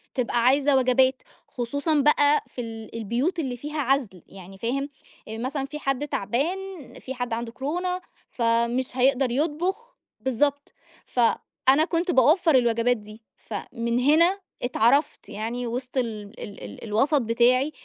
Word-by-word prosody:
تبقى 240 -2 0
عايزة 275 +2 +4
وجبات 260 0 +3 0.3
خصوصًا 285 +5 0
بقى 290 +1 +4
في 250 - -7
ال 225 -1 -8
البيوت 245 - -1
اللي 260 -5 -3
فيها 295 +4 -4
عزل 255 - 0
يعني 195 0 -12
فاهم؟ 270 +7 -2 0.4
آآ 220 +1 -6
مثلًا 270 +3 -3
في 300 +2 -7
حد 275 0 -1
تعبان 275 - -1 0.4
في 265 - -6
حد 245 -2 -3
عنده 230 0 -3
كورونا 355 +9 -3 0.3
فمش 235 +2 +1
هيقدر 260 0 +3
يطبخ 345 - -2 0.2
بالضبط 285 +3 0 0.3
فأنا 265 +4 +2
كنت 350 +1 0
باوفّر 310 +4 +4
الوجبات 240 -1 +3
دي، 215 +1 -13 0.2
فمن 235 +3 -3
هنا 335 +8 +4 0.2
اتعرفت 245 +4 +1
يعني 235 +3 -4
وسط 250 +3 -5
ال 220 -3 -3
ال 200 - -9
ال - - -9
الوسَط 255 +7 +2
بتاعي 245 +5 +3
255 Hz, 140 wpm, -25 LUFS, 235-290 Hz, 0.4 s, عايزة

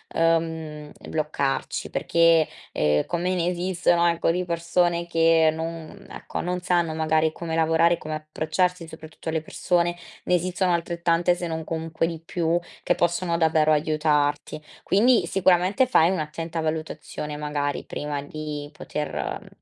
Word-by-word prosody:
uhm, 165 0 +4
mhmm, 155 -2 -7 0.2
bloccarci 150 -3 -2
perché, 165 -2 +3 0.3
ehm, 75 0 +2
come 175 +1 -1
ne 175 -1 0
esistono, 175 -1 +2
ecco, 170 -1 +2
di 180 +1 -1
persone 170 0 0
che 165 -1 +4
non 165 0 -7
ecco, - - -6
non 180 +1 -2
sanno, 175 -2 +1
magari, 160 0 +2
come 165 -1 -4
lavorare, 165 +1 +3
come 155 -1 -5
approcciarsi, 160 +3 -1
soprattutto 160 0 -9
alle 160 0 -1
persone, 175 +2 0 0.3
ne - - +1
esistono 180 +1 0
altrettante, 170 +1 +1
se 175 0 -4
non 160 -1 -3
comunque 160 0 -2
di 165 -2 -5
più, 165 +1 0 0.2
che 175 - +2
possono 175 0 0
davvero 160 -1 +3
aiutarti. 150 -1 0 0.2
Quindi, 225 0 +4
sicuramente, 190 +7 +3
fai 170 -9 +4
un'attenta 165 -1 -3
valutazione, 155 -1 -4
magari, 145 -1 -2
prima 145 -1 -4
di 150 0 -6
poter, 150 0 -5 0.3
uhm, - - -16
165 Hz, 140 wpm, -24 LUFS, 155-175 Hz, 0.3 s, uhm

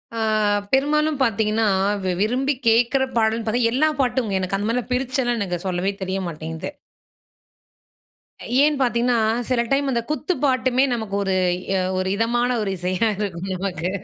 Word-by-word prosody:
ஆ - - -3 0.5
பெரும்மாலும் 300 +2 +2
பாத்தீங்கன்னா 220 -1 +1 0.4
வி 185 - 0
விரும்பி 255 +6 +1
கேக்கற 240 +4 +3
பாடல் 225 +1 +1
பாத்தா 235 +3 +1
எல்லா 310 +4 +3
பாட்டுங்க. 245 -6 0
எனக்கு 190 +1 -1
அந்த 205 +2 -2
மாரிலாம் 250 +2 -2
பிரிச்சலாம் 250 -1 0
எனக்கு 180 -2 -3
சொல்லவே 180 +2 0
தெரிய 190 +1 -2
மாட்டேங்குது. 160 0 -6 1.9
ஏன் 300 0 +3
பாத்தீங்கன்னா 240 -1 +2 0.3
சில 255 -2 +1
டைம் 275 +1 +1
அந்த 235 -2 0
குத்து 305 +4 -1
பாட்டுமே 260 -1 +2
நமக்கு 220 -4 -2
ஒரு 195 -1 0 0.4
அ - - +1 0.2
ஒரு 185 - -1
இதமான 240 +3 +1
ஒரு 205 - -2
இசையா 185 +5 0
இருக்கும் 190 -3 -4
நமக்கு. 180 -2 -3
230 Hz, 145 wpm, -22 LUFS, 195-255 Hz, 1.9 s, கேக்கற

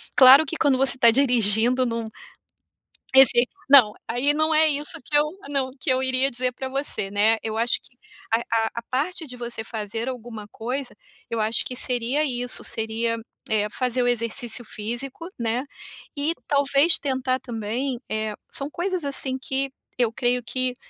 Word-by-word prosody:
claro 270 +3 +8
que 320 - -5
quando 275 -3 +2
você 265 -1 +2
tá 235 -2 +6
dirigindo 245 -1 +5
num 230 -1 -3 1.1
esse 250 -2 +6 0.2
não, 255 -7 +7
aí 250 +5 +1
não 310 +1 +1
é 315 +1 +5
isso 295 0 -4
que 295 - -3
eu 295 - +3 0.2
não, 275 -2 -1
que - - -4
eu 255 0 +1
iria 260 +1 +1
dizer 250 +1 -2
para 260 +2 -6
você, 265 -7 -3
né, 210 +2 +3
eu 220 -1 -4
acho 230 +1 +1
que 250 - -20 0.4
a 225 - +4
a 225 -1 +1
a 235 - -3
parte 315 +5 -2
de 250 - -7
você 235 -1 -4
fazer 225 +1 -5
alguma 230 -4 -8
coisa, 250 +5 -5 0.3
eu 230 - -2
acho 220 +2 +1
que 250 - -6
seria 250 +3 -1
isso, 245 -2 -3
seria, 225 +1 -1 0.3
eh, 210 -2 +1
fazer 250 +2 -1
o - - +1
exercício 240 0 0
físico, 240 +10 -6
né. 235 +2 -1 0.5
E 295 +3 0
talvez 280 +3 +4
tentar 260 -2 -1
também, 240 +2 -4
eh, 215 0 -2 0.2
são 275 - -1
coisas 360 0 -2
assim 265 -1 -1
que 270 +1 -2 0.3
eu 240 -3 +2
creio 245 0 0
que 255 +1 -2
250 Hz, 170 wpm, -23 LUFS, 230-275 Hz, 1.1 s, claro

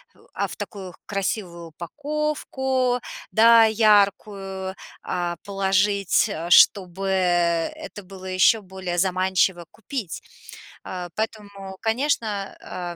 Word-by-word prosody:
в - - -24
а - - -1
в - - -9
такую 190 -4 -7
красивую 185 -4 -3
упаковку, 265 - -2 0.3
да, 230 0 +7
яркую, 200 -3 +1 0.3
а, 175 -1 -2
положить, 195 0 +1
э-э, 165 +2 -5
чтобы 190 +1 +5 0.8
это 205 -8 -10
было 190 0 -12
ещё 185 +4 +3
более 190 -2 -5
заманчиво 185 -1 +1
купить. 225 - -6 0.7
Э, 180 -1 -6
поэтому, 200 -3 -5
конечно, 235 +1 0 0.3
э-э, 175 -1 -6
195 Hz, 100 wpm, -23 LUFS, 185-220 Hz, 0.8 s, да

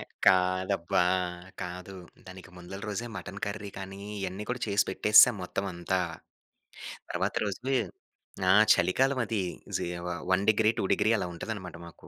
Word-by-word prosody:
ఎ - - -6 0.2
కాదబ్బా! 95 -1 +3 0.6
కాదు. 90 +2 -7 0.3
దానికి 95 0 -11
ముందల 90 +3 -9
రోజే 110 +3 -3
మటన్ 100 0 -7
కర్రీ 100 0 -5
కానీ, 95 0 -8 0.2
ఇయన్నీ 95 +2 -4
కూడా 125 0 -3
చేసి 100 -1 +2
పెట్టేసేశాం 105 +4 +6
మొత్తవంతా. 95 -1 -2 1.1
తర్వాత - - -1
రోజు 105 +7 -3 0.8
ఆ! - - +7 0.2
చలికాలవది. 115 +3 +1 0.3
జీ - - -3 0.2
వ - - -2 0.2
వన్ 95 +2 +3
డిగ్రీ 110 0 +4
2 - - 0
డిగ్రీ, 110 - +2
అలా 100 - -2
ఉంటదనమాట 90 -1 -6
మాకు. 85 - -14
95 Hz, 135 wpm, -29 LUFS, 90-105 Hz, 1.1 s, ఆ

